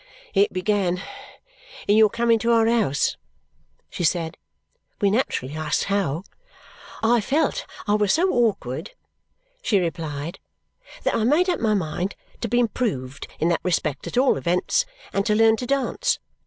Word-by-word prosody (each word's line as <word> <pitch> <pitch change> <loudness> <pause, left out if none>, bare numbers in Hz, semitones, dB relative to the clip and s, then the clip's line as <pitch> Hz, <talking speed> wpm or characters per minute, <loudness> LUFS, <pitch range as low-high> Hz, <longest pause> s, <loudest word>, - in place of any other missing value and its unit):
"It 200 0 +3
began 185 -1 0 0.9
in 205 - +4
your 215 -1 +6
coming 230 +1 +2
to 235 +1 +1
our 225 -1 +4
house," 220 - +1 0.7
she - - -4
said. 165 0 0 0.6
We 200 -1 +3
naturally 175 - -1
asked 155 -1 0
how. 190 -5 -1 0.8
"I 235 +1 +4
felt 315 - 0 0.2
I 205 - +3
was 210 -2 +3
so 355 +4 +3
awkward," 220 - 0 0.7
she 220 - +2
replied, 160 -2 -4 0.6
"that - - +1
I 220 - +1
made 320 +10 +3
up 345 - -2
my 215 -2 +2
mind 180 +1 -2 0.2
to 235 - -2
be 240 +2 +2
improved 195 - -2
in 165 - +2
that 170 - +1
respect 160 -5 -1
at - - -5
all 260 - +4
events 180 - +1 0.3
and 195 - +1
to 210 - +3
learn 225 0 +5
to 250 - -5
dance. 275 -1 0
205 Hz, 155 wpm, -23 LUFS, 170-235 Hz, 0.9 s, your